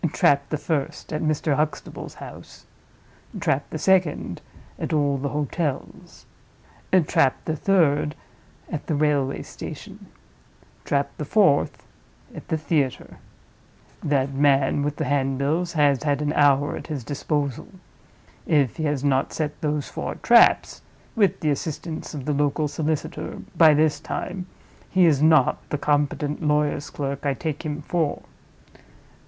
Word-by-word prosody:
Trap 140 0 +3
the 155 - -1
first, 150 -1 -3
at 155 - -2
Mr. 155 -1 +1
Huxtable's 155 0 -3
house; - - -11 0.7
trap 140 +2 0
the - - -4
second, 170 - +1 0.4
at - - -3
all 145 -2 +2
the 140 +1 -2
hotels; 150 0 -4 0.8
trap 135 -2 +3
the 160 - -1
third, 150 -4 +2 0.6
at 155 -4 -5
the 155 - 0
railway 145 -2 +1
station; - - -9 0.8
trap 140 0 0
the - - -3
fourth, 175 -2 +2 0.5
at - - -10
the 160 - 0
theater. 145 -4 -1 0.9
That 140 -2 +1
man 140 0 +3
with 145 0 -1
the 155 - -2
handbills 140 +5 0
has 145 -4 +3
had 145 -2 0
an 150 0 0
hour 145 -1 +3
at - - -8
his 145 -6 -4
disposal. 145 0 -2 0.8
If 145 -7 +2
he 155 - -2
has 145 -2 -1
not 135 -1 +1
set 150 -2 -3
those 150 -2 -1
four - - -5
traps - - +4 0.3
(with 205 -4 +2
the 155 - +1
assistance 155 +2 -4
of 135 -3 -6
the 150 - 0
local 145 +1 +1
solicitor) 155 +2 -3 0.2
by 160 -3 +7
this 150 -1 +2
time, 180 +4 -5 0.4
he 185 -1 +4
is 150 -4 +3
not 155 -4 +4
the 150 - -1
competent 145 +1 0
lawyer's 150 -1 0
clerk 140 -1 -4
I 140 -2 0
take 155 0 -4
him 150 -1 -4
for. 160 -2 -1
150 Hz, 140 wpm, -24 LUFS, 140-155 Hz, 0.9 s, by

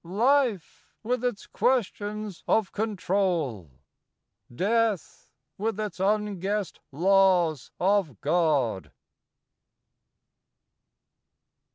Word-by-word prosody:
Life! 230 - 0 0.2
with 250 +2 -1
its 245 -5 -2
questions 210 -5 -1
of 220 -3 +2
control! 185 - -1 0.8
Death! 210 - -1 0.3
with 215 0 -2
its 210 -5 -4
unguessed 205 0 -1
laws 180 -2 +3
of 185 - +1
God! 145 - +1
195 Hz, 65 wpm, -26 LUFS, 170-215 Hz, 0.8 s, laws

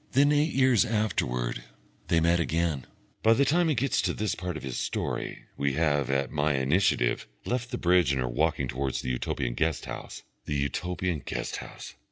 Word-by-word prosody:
Then 145 +2 +5
eight 150 +2 +3
years 130 -4 +4
afterwards 60 - -1 0.5
they 85 - +3
met 85 +1 +3
again. 80 -4 0 0.3
By 115 - +6
the 140 - +3
time 170 +4 +3
he 150 - +2
gets 130 +2 +1
to - - -1
this 110 -2 -1
part 90 -1 -4
of - - -9
his 65 -2 -3
story - - -3
we 70 -1 +1
have, 75 -3 +1
at 70 0 0
my 75 -1 +1
initiative, 65 -2 +2 0.2
left 125 0 -2
the 125 - -3
bridge 90 -5 +3
and 70 - 0
are 65 - 0
walking 70 +2 0
towards 65 +1 -2
the 65 - -2
Utopian - - -2
guest 80 +4 0
house. - - -7 0.2
The 75 - -2
Utopian 85 +4 -1
guest - - -3
house! - - -9
80 Hz, 190 wpm, -28 LUFS, 70-110 Hz, 0.5 s, By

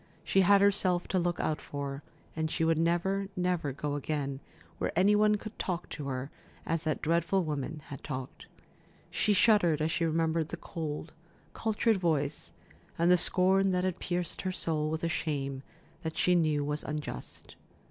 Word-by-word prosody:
She 195 - +3
had 200 +2 +6
herself 190 -3 +3
to 185 - +2
look 175 -1 -1
out 155 - -1
for, 140 -1 -5 0.3
and 160 0 -1
she 165 - -1
would 165 -1 +2
never, 175 +4 +1
never 180 -5 0
go 145 +2 -3
again 140 -1 -2 0.4
where - - -1
any 200 +3 +5
one 210 0 +4
could 215 +1 -8
talk 175 -2 -3
to 145 -3 -6
her 130 +1 -4 0.3
as 165 0 -1
that 155 - -1
dreadful 170 +3 +2
woman 150 0 -4
had 140 - -8
talked. 130 -3 -6 0.6
She 210 - +1
shuddered 190 -7 +4
as 155 +1 0
she 170 - 0
remembered 160 0 +1
the 170 - -5
cold, 155 -2 -5 0.4
cultured 220 0 +1
voice, 155 -5 0 0.5
and 170 +2 +4
the - - +8
scorn 190 +2 +4
that 180 0 +1
had 185 -2 -1
pierced 175 -1 -2
her 185 - -2
soul 155 -4 -1
with 160 +1 -3
a - - +2
shame 140 -4 -2 0.4
that 160 -2 -5
she 180 - +3
knew 155 -4 +2
was 150 +1 -2
unjust. 150 +1 -6
165 Hz, 175 wpm, -30 LUFS, 150-180 Hz, 0.6 s, the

